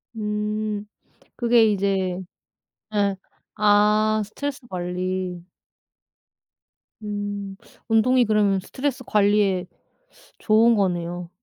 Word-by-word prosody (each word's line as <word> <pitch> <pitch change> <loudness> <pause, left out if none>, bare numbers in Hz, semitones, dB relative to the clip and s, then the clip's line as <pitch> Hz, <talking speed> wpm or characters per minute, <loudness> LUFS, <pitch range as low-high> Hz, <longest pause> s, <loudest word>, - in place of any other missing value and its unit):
음. 210 0 -2 0.5
그게 235 -1 +4
이제 190 -2 0 0.7
예. 200 -2 +1 0.4
아 210 +1 +3
스트레스 285 +6 -5
관리. 180 0 -3 1.6
음. 205 -1 -4 0.3
운동이 240 +2 +4
그러면 205 -2 +2
스트레스 260 +6 -4
관리에 200 -3 +2 0.7
좋은 225 +2 +4
거네요. 175 -2 -1
205 Hz, 170 characters per minute, -23 LUFS, 190-215 Hz, 1.6 s, 그게